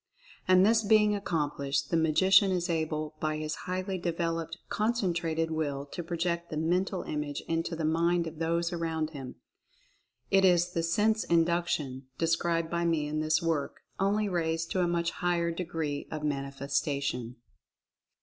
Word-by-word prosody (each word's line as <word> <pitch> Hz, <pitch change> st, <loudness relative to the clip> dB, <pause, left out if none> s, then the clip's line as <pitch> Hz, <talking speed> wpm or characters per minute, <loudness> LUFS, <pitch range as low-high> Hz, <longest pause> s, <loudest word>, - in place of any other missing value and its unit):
And 185 Hz, 0 st, +6 dB
this 225 Hz, +1 st, +4 dB
being 210 Hz, 0 st, +4 dB
ac 205 Hz, -1 st, -4 dB
complished, 140 Hz, -3 st, -1 dB
the -, -, +2 dB
Magician 185 Hz, +5 st, +5 dB
is 180 Hz, -2 st, 0 dB
able 155 Hz, -1 st, -2 dB
by 155 Hz, -1 st, -1 dB
his 155 Hz, 0 st, -3 dB, 0.2 s
highly 185 Hz, +1 st, -2 dB
devel 165 Hz, -1 st, -1 dB
oped 165 Hz, +1 st, -9 dB
Concentrated 175 Hz, -8 st, 0 dB
Will 145 Hz, -3 st, -2 dB
to -, -, -4 dB
project 170 Hz, 0 st, -2 dB
the 155 Hz, -, -4 dB
Mental 180 Hz, +4 st, 0 dB
Image 150 Hz, -1 st, -3 dB
into 165 Hz, +1 st, -1 dB
the 160 Hz, -1 st, -2 dB
mind 170 Hz, +2 st, +2 dB
of 160 Hz, -1 st, -7 dB
those 170 Hz, +1 st, 0 dB
around 160 Hz, -2 st, -2 dB
him. 135 Hz, -4 st, -8 dB, 1.0 s
It 195 Hz, -1 st, +5 dB
is 175 Hz, -1 st, +4 dB
the 165 Hz, -, 0 dB
Sense 210 Hz, +7 st, +2 dB
Induction, 165 Hz, -6 st, 0 dB
described 165 Hz, 0 st, 0 dB
by 170 Hz, 0 st, 0 dB
me 165 Hz, -3 st, +1 dB
in 155 Hz, +1 st, -2 dB
this 155 Hz, +2 st, +1 dB
work, 160 Hz, -4 st, -1 dB, 0.2 s
only 205 Hz, +2 st, +2 dB
raised 165 Hz, -3 st, -1 dB
to 185 Hz, -, +1 dB
a 175 Hz, -, +2 dB
much 170 Hz, -1 st, 0 dB
higher 170 Hz, -1 st, 0 dB
degree 165 Hz, -4 st, -3 dB
of 155 Hz, -1 st, -5 dB
manifestation. 140 Hz, -3 st, -2 dB
165 Hz, 160 wpm, -29 LUFS, 155-175 Hz, 1.0 s, And